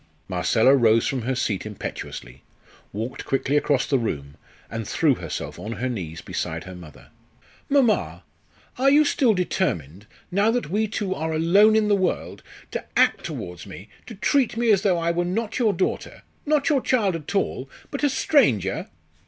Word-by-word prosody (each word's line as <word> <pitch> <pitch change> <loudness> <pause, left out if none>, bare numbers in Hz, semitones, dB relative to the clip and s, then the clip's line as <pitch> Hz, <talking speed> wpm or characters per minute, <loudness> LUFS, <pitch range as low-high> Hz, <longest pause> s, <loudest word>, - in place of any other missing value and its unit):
Marcella 100 +8 +3
rose 115 -3 +4
from 135 -2 -1
her 130 +3 -2
seat 105 -6 -1
impetuously, 70 - -7 0.5
walked 110 +5 -5
quickly 135 +1 -1
across 145 -3 +2
the 135 - +1
room, 70 -11 -4 0.3
and 115 -2 -5
threw 155 -4 +2
herself - - -6
on 110 - -5
her 125 +2 -3
knees 85 -10 -5
beside 80 +1 -4
her 95 - -9
mother. 85 -6 -13 0.6
"Mamma, 270 -6 +2 0.6
are 270 +1 +5
you 295 +2 +5
still 250 -6 +2
determined 105 - -2 0.2
now 200 +4 +3
that 235 -9 -1
we 215 +3 +1
two 205 -3 -2
are 160 -1 -3
alone 195 +7 +5
in 220 -1 +3
the 210 - +3
world 185 -2 -2 0.3
to - - -4
act - - +3
towards 90 +2 -7
me, 95 +2 -11 0.2
to 225 - -8
treat 250 +3 +1
me 235 -1 +3
as 195 -3 +4
though 190 -4 +2
I 170 0 0
were 175 +1 0
not 215 +6 -2
your 225 -4 +3
daughter 185 -1 -3 0.2
not 300 -2 +2
your 285 -4 +3
child 210 -9 +1
at 165 +4 -6
all, 135 -8 -1 0.2
but 280 - -4
a 290 - +4
stranger?" 125 - +2
160 Hz, 175 wpm, -24 LUFS, -, 0.6 s, are